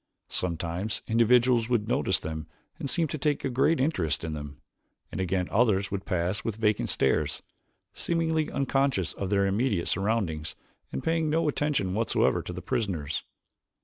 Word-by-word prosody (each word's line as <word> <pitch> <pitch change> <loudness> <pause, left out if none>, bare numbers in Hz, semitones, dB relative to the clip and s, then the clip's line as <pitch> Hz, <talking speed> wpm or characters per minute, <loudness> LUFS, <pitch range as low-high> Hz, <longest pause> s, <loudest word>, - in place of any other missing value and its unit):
Sometimes 90 +3 -2
individuals 120 +1 +4
would 115 -4 +1
notice - - +2
them 80 -1 -5 0.3
and 140 - -3
seem 165 +2 +2
to 155 - -4
take 145 +1 0
a 135 - -1
great 145 +6 +3
interest 130 - 0
in 80 -1 -3
them, 75 -2 -7 0.5
and - - -3
again 90 0 0
others 105 -4 +2
would 100 -1 -4
pass 90 +1 -1
with 115 - -2
vacant 105 -1 +1
stares, 65 - +1 0.5
seemingly 160 -2 0
unconscious 135 - +1
of 95 - -4
their 100 -1 +3
immediate 100 -2 +1
surroundings 95 -6 -1 0.4
and 65 - -4
paying 165 -1 +1
no 160 +1 +2
attention 145 -10 0
whatsoever 110 +3 +2
to - - -7
the - - -7
prisoners. 80 -9 -2
105 Hz, 155 wpm, -28 LUFS, 90-135 Hz, 0.5 s, individuals